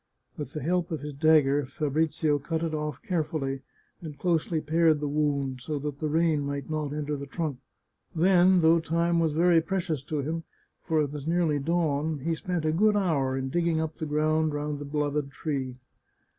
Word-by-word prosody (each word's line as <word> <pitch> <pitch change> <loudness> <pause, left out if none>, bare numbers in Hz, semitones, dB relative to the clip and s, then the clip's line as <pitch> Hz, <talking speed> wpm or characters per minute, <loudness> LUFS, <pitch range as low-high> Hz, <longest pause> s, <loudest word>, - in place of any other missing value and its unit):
With 145 -1 -6
the 150 - -4
help 175 +2 0
of 160 -4 -3
his 150 0 -6
dagger 145 -1 +4
Fabrizio 150 +1 0
cut 160 +3 -2
it 165 -1 -2
off 150 -3 -4
carefully, 150 -6 -2 0.4
and 155 -4 -8
closely 165 0 0
pared 160 0 +3
the 150 - -2
wound, 140 -3 -1
so 150 +4 -3
that 145 0 -5
the 155 - -1
rain 160 -1 +2
might 140 +1 -4
not 155 -2 -2
enter 150 0 -2
the 140 0 -6
trunk. 150 -3 -3 0.6
Then, 180 +1 +5
though 165 +1 +5
time 170 +1 +1
was 160 -2 +1
very 170 +1 +4
precious 170 -5 -2
to 150 0 -2
him, 165 +3 -3 0.4
for 160 -1 +1
it 145 - -3
was 145 0 -6
nearly 165 -3 +2
dawn, 155 -1 0
he 160 +5 -2
spent 175 -1 -3
a 155 - +2
good 210 +6 +3
hour 140 -9 +1
in 130 0 -2
digging 170 +1 +1
up 160 0 -3
the 155 - -4
ground 155 +1 +1
round 145 0 -3
the 145 - -6
beloved 145 -1 -1
tree. 140 -3 -3
155 Hz, 190 wpm, -27 LUFS, 145-165 Hz, 0.6 s, Then